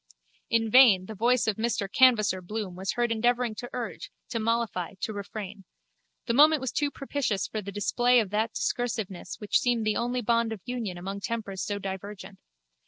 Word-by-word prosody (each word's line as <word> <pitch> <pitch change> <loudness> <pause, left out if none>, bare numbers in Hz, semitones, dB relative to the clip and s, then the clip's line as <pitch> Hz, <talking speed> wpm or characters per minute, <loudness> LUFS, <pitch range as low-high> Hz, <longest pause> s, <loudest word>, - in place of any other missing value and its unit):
In 225 -1 +1
vain 225 -8 +7
the 220 - -7
voice 240 +4 +2
of 215 -2 0
Mr 225 -3 -1
Canvasser 215 -5 +4
Bloom 200 0 -5
was 190 +1 -3
heard 240 -1 0
endeavouring 240 +1 +1
to 245 +3 -7
urge, 240 -3 -5 0.2
to 230 - -2
mollify, 220 -5 -1
to 220 - -2
refrain. 200 -1 -7 0.6
The 235 - 0
moment 305 +4 +6
was 260 -3 -3
too 290 +3 0
propitious 275 -8 -2
for 215 - -4
the 200 0 -7
display 240 +5 +3
of 210 -4 -2
that 215 +1 0
discursiveness 220 -4 -3
which 210 -1 +2
seemed 240 -3 0
the 215 -1 +1
only 245 +1 -1
bond 230 0 +1
of 210 - -9
union 235 -7 -4
among 195 +3 -5
tempers 200 -3 -4
so 205 - -2
divergent. 195 0 -7
220 Hz, 180 wpm, -27 LUFS, 200-240 Hz, 0.6 s, vain